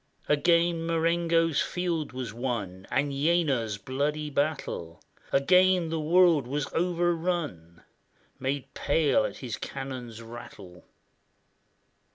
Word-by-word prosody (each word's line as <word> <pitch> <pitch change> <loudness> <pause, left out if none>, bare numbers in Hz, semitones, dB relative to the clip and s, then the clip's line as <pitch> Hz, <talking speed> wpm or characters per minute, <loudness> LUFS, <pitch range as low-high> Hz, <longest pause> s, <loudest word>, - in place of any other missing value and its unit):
Again 170 +2 +3
Marengo's 165 -1 +2
field 175 -4 -2
was 125 -3 -5
won, 110 -7 -4
And 140 +1 0
Jena's 140 -7 +1
bloody 145 +6 -2
battle; 140 - -2 0.3
Again 180 +4 +4
the 165 0 -2
world 165 -3 +4
was 145 +2 -2
overrun, 170 - -1 0.6
Made 135 +1 -3
pale 145 -6 +2
at - - -5
his 120 -4 -5
cannon's 130 -4 -6
rattle. 100 -6 -11
145 Hz, 100 wpm, -28 LUFS, 125-170 Hz, 0.6 s, Again